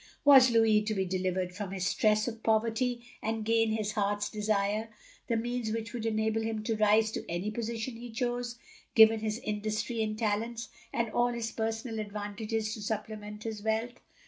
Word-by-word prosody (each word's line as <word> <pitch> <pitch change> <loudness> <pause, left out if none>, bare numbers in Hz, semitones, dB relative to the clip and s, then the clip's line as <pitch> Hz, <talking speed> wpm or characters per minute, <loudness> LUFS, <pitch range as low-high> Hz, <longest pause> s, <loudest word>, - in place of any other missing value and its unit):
Was 265 -3 +9
Louis 225 -2 +4
to 215 0 -1
be 190 -1 0
delivered 185 0 -1
from 200 0 -5
his 190 -1 -3
stress 215 +3 +2
of 225 -2 -5
poverty, 230 +2 +1 0.2
and 220 0 -2
gain 225 0 +3
his 215 -1 -1
heart's 205 0 0
desire 210 +1 0 0.2
— - - -26
^the 230 -1 +2
means 240 -1 -2
which 225 -1 -4
would 230 -2 -2
enable 220 0 +1
him 220 -1 -2
to 225 0 0
rise 215 +1 +4
to - - -4
any 175 +5 -2
position 230 +1 -4
he 240 +1 -8
chose 240 +1 -2 0.2
— - - -29
given 220 0 +8
his 215 0 -2
industry 215 +2 -2
and 215 -1 -1
talents, 225 +2 -1 0.2
and 235 -2 -1
all 240 0 +3
his 235 -1 -3
personal 225 +1 -3
advantages 215 +1 -3
to 215 - -6
supplement 210 0 -5
his 220 -2 -4
wealth? 220 +3 -1
220 Hz, 185 wpm, -30 LUFS, 210-230 Hz, 0.2 s, Was